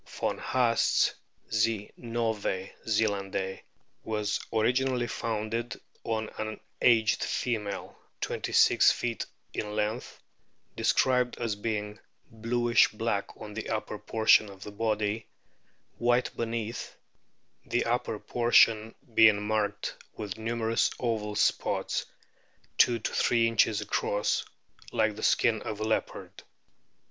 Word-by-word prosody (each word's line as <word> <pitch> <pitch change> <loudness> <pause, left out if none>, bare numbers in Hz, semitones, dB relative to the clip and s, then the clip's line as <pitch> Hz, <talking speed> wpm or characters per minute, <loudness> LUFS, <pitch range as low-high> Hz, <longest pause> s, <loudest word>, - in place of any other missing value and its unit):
Von - - -3
Haast's 120 -3 +2 0.4
Z. 110 -1 +1
novae 110 -5 -2
zelandiae 100 -3 -1 0.4
was 105 -1 -1
originally 125 +2 +1
founded 115 0 -3 0.2
on 110 -1 -2
an 110 0 -4
" - - -44
aged 115 -3 +4
female 105 -5 -3
' - - -46
twenty - - -3
six - - +6
feet 120 -1 -3 0.3
in 105 0 -4
length, 110 +3 -2 0.6
described 125 -1 +2
as 115 -3 -2
being 105 0 -3 0.3
"bluish 120 +1 +3
black 105 -2 -3
on 105 -1 -8
the 110 - -5
upper - - -3
portion 110 -1 +4
of 95 0 -11
the 105 - -8
body, 105 0 -1 0.7
white 120 +1 +2
beneath, 115 -1 -4 0.7
the - - 0
upper - - -1
portion 115 -2 +3 0.2
being 110 -2 +6
marked 105 -1 -1 0.2
with 105 -3 -5
numerous 115 0 0
oval 110 -4 -2
spots, - - 0 0.7
two 120 - +5
to 110 - -3
three 115 -1 +3
inches 110 -2 +2
across, 105 0 0 0.5
like 110 -1 +1
the 110 - -8
skin 115 -2 +3
of 105 -1 -5
a - - -2
leopard." 110 0 -3
110 Hz, 115 wpm, -29 LUFS, 105-115 Hz, 0.7 s, six